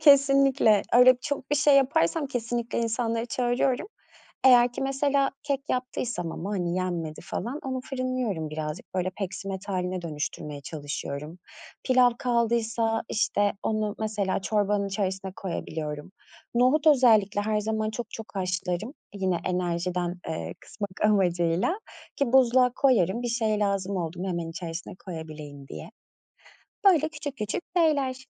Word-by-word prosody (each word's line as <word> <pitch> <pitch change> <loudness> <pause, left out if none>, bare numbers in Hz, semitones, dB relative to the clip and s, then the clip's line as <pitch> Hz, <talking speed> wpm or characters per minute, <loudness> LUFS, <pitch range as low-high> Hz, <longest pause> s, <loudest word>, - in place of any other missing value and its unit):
Kesinlikle. 275 -6 +5
Öyle 250 +1 +8
çok 285 -2 -4
bir 295 - +3
şey 290 -1 +5
yaparsam 275 - +2
kesinlikle 240 -2 -2
insanları 230 0 -1
çağırıyorum. 245 +4 0 0.6
Eğer 245 -1 +7
ki 255 - -4
mesela 275 0 +1
kek 285 -2 -1
yaptıysam 240 -8 -2
ama, 190 +5 -5
hani, 175 -3 -1
yenmedi 170 -4 -3
falan 240 +11 -4
onu 260 -1 -2
fırınlıyorum 255 - -2
birazcık. 155 +3 -6
Böyle, 185 0 0
peksimet 195 0 -5
hâline 185 -1 -2
dönüştürmeye 150 -2 -5
çalışıyorum. 145 +2 -6 0.5
Pilav 255 -1 +5
kaldıysa, 230 -2 +1
işte, 205 -2 +1
onu 215 -1 0
mesela 210 -3 -1
çorbanın 205 -1 +1
içerisine 190 -1 -2
koyabiliyorum. 155 -3 -5 0.4
Nohut 255 +6 +3
özellikle 220 -8 +5
her 210 +1 0
zaman 215 0 -1
çok 230 0 -6
çok 225 - -7
haşlarım. 185 - -2 0.2
Yine 190 -3 0
enerjiden, 180 0 -1
eee, 85 +1 -4
kısmak 205 -2 -6
amacıyla 185 - +2 0.4
ki 275 -4 0
buzluğa 250 -1 +5
koyarım 235 -5 +3
bir 240 - -1
şey 225 -3 0
lazım 200 -1 0
oldu 170 -1 -3
mu, 190 - -2
hemen 170 -2 -2
içerisine 170 +1 -6
koyabileyim 155 -5 -8
diye. 165 - -8 1.0
Böyle 320 -5 +5
küçük 295 -3 -6
küçük 210 - -3
şeyler. 275 -6 +1
215 Hz, 130 wpm, -27 LUFS, 180-255 Hz, 1.0 s, Öyle